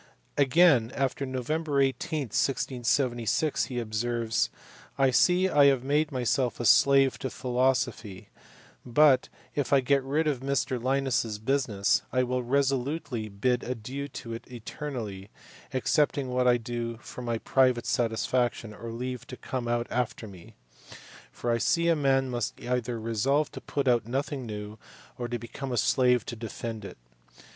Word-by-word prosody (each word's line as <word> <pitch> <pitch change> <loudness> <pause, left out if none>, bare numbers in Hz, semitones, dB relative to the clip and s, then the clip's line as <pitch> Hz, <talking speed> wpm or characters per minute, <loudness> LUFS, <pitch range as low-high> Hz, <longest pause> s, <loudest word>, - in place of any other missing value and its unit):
Again 140 -4 +4
on 135 0 -1
Nov. 130 +1 -3
18, 145 -2 0
1676, 120 0 0
he 125 +2 -6
observes, 115 0 -1 0.2
" 125 - -23
I 135 -1 +4
see 180 +8 +4
I 145 -6 +5
have 135 -3 +4
made 150 +3 +1
myself 125 -1 0
a 120 - -2
slave 135 +2 +5
to 130 - -3
philosophy; 125 -6 -1 0.5
but, 130 +1 +4 0.2
if 145 -3 -2
I 140 - +6
get 140 +2 +2
rid 145 +4 0
of 145 -5 0
Mr 135 -1 -1
Liims 135 +1 +1
s 110 -2 -5
business, 110 -4 +1
I 130 0 +2
will 125 0 -1
resolutely 135 -1 -1
bid 125 +5 0
adieu 130 +4 -5
to 115 -4 -8
it 115 +2 -9
eternally, 115 -5 -6 0.4
excepting 140 0 +1
what 125 0 +1
I 120 -1 +5
do 120 0 -4
for 120 - -10
my 120 -2 -2
private 130 0 +2
satisfaction, 120 -1 0
or 115 +2 -8
leave 125 +2 -5
to 125 - -8
come 125 -2 -4
out 120 0 0
after 120 -2 -2
me; 95 -4 -13 0.8
for 120 - -3
I 115 - +1
see 170 +7 +2
a 165 - +4
man 135 -3 +2
must 120 -3 -3
either 125 -1 -2
resolve 115 +7 0
to - - -8
put 140 -2 -2
out 120 -3 +3
nothing 135 0 -3
new, 105 0 -7 0.4
or 120 - -2
to 120 0 -3
become 130 +3 -7
a 120 - -1
slave 125 +1 +3
to 120 - -5
defend 115 -1 -6
it." - - -9
125 Hz, 155 wpm, -28 LUFS, 115-135 Hz, 0.8 s, I